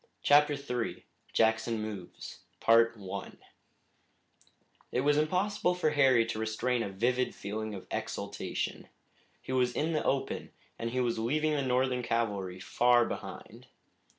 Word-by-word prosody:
CHAPTER 145 +1 +5
III 125 -4 -4 0.3
JACKSON 110 0 +2
MOVES 105 -4 -7 2.5
It 125 - +1
was 145 +1 +3
impossible 180 +3 +1
for 170 -4 +1
Harry 135 -5 +4
to 115 -1 -4
restrain 115 +3 0
a 105 - -2
vivid 120 +6 0
feeling 110 +1 -4
of 95 - -9
exultation. - - -4 0.6
He - - -6
was 125 -1 +1
in 160 +2 0
the 155 - 0
open, 135 0 -1 0.3
and 115 - -2
he 130 +2 -2
was 120 -2 0
leaving 155 +7 +1
the 145 - +1
Northern 130 -1 +1
cavalry 100 -6 -1
far 120 +4 +3
behind. - - -8
125 Hz, 125 wpm, -30 LUFS, 110-140 Hz, 2.5 s, CHAPTER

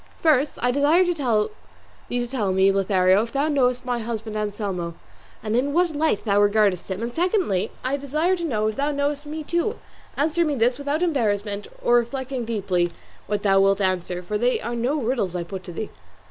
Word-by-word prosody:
First, 300 -4 +2
I 245 - +3
desire 295 +7 +4
thee 350 - +1
to 210 - -3
tell 230 -6 -1
me, 190 +1 +4
Lothario, 190 0 +3
if 230 +1 -4
thou 280 +2 +1
knowest 255 -4 +1
my 245 -1 -1
husband 225 -1 -5
Anselmo, 200 -5 -3 0.5
and 215 0 -1
in 275 +4 +1
what 345 -1 +2
light 300 -8 +1
thou 205 -1 +3
regardest 205 -3 +2
him; 190 +4 -3
and 235 +1 -3
secondly 350 - +1 0.2
I 270 +2 0
desire 305 +6 0
to 345 - -5
know 220 -10 0
if 215 0 -1
thou 285 +1 +1
knowest 285 0 -1
me 310 +1 -5
too. 345 +8 -1 0.4
Answer 315 +4 +2
me 300 -3 0
this, 245 +2 +1
without 285 +4 -1
embarrassment 205 - 0 0.2
or 240 - +5
reflecting 260 +1 -2
deeply 190 -6 0 0.4
what 205 0 -2
thou 195 -1 +4
wilt 195 0 +3
answer, 180 -2 -1
for 210 +4 -2
they 245 +2 +2
are 235 - -4
no 250 +6 0
riddles 225 -7 -1
I 175 - -1
put 185 +2 -7
to 180 - -7
thee." 210 +5 -5
235 Hz, 195 wpm, -23 LUFS, 200-285 Hz, 0.5 s, or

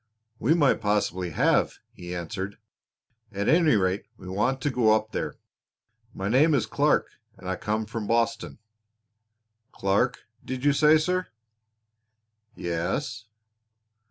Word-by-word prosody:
"We 150 +8 +3
might 145 -8 +3
possibly 100 -4 0
have," 75 - +2 0.2
he 90 0 -8
answered. 95 +3 -5 0.7
"At 100 0 -3
any 160 -5 +4
rate 95 0 0
we - - -12
want 105 +8 0
to 145 - 0
go 115 -4 +4
up 110 0 -2
there. - - -3 0.8
My 95 -2 -4
name 145 +8 +4
is 120 -5 +1
Clark 110 - +1 0.3
and - - -10
I 95 - -1
come 110 +2 -2
from 110 -1 -5
Boston." 115 0 0 1.1
"Clark, 100 +7 0 0.2
did 130 +1 -5
you 145 - +5
say, 150 +2 +5
sir?" 180 +4 -1 1.3
"Yes." 90 - -3
110 Hz, 130 wpm, -26 LUFS, 95-135 Hz, 1.3 s, you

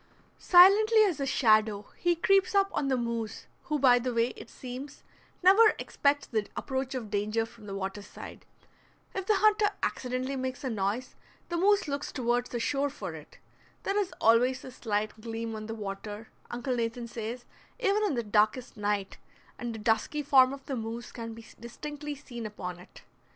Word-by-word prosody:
Silently 420 +5 +7
as 370 -8 +1
a 275 - -1
shadow 215 -5 +3
he 350 -1 +1
creeps 390 +5 +3
up 395 0 +3
on 280 - 0
the 265 -1 +2
moose, 235 -2 -3 0.2
who 300 - 0
by 250 -3 +5
the 250 +1 -2
way, 235 0 +2
it - - -11
seems, 255 +3 -8 0.4
never 425 +4 +7
expects 285 0 0
the 215 -3 -2
approach 265 -1 -3
of 225 -5 -5
danger 215 +2 0
from 225 -2 -15
the 195 - -5
water 195 +1 -4
side. - - -11 0.7
If 380 -1 -4
the 430 - +4
hunter 420 +1 +4 0.2
accidentally 255 +2 -2
makes 260 +2 -4
a 260 - -2
noise 215 +4 -2 0.4
the 345 - -1
moose 395 +2 +3
looks 285 0 -3
toward 245 -1 0
the 240 - -4
shore 280 +4 0
for 280 - -6
it. - - -12 0.5
There 400 +1 0
is 395 -2 -1
always 250 +3 +3
a 260 - -8
slight 215 -2 -3
gleam 225 0 -4
on 215 0 -6
the 225 - -5
water, 205 +1 -6 0.2
Uncle 245 +1 -2
Nathan 235 0 -2
says, 235 +2 -6 0.3
even 425 -2 +2
in 395 -10 +1
the 235 - -1
darkest 215 +4 +1
night, 205 -1 -2 0.4
and 240 -1 -3
the 225 - -6
dusky 225 +7 0
form 260 -2 +6
of 275 0 -8
the 270 - -3
moose 230 0 -5
can 230 -1 -7
be 230 0 -12
distinctly 295 +5 -6
seen 240 -5 -7
upon 180 -4 -7
it. 180 - -15
245 Hz, 180 wpm, -29 LUFS, 225-290 Hz, 0.7 s, Silently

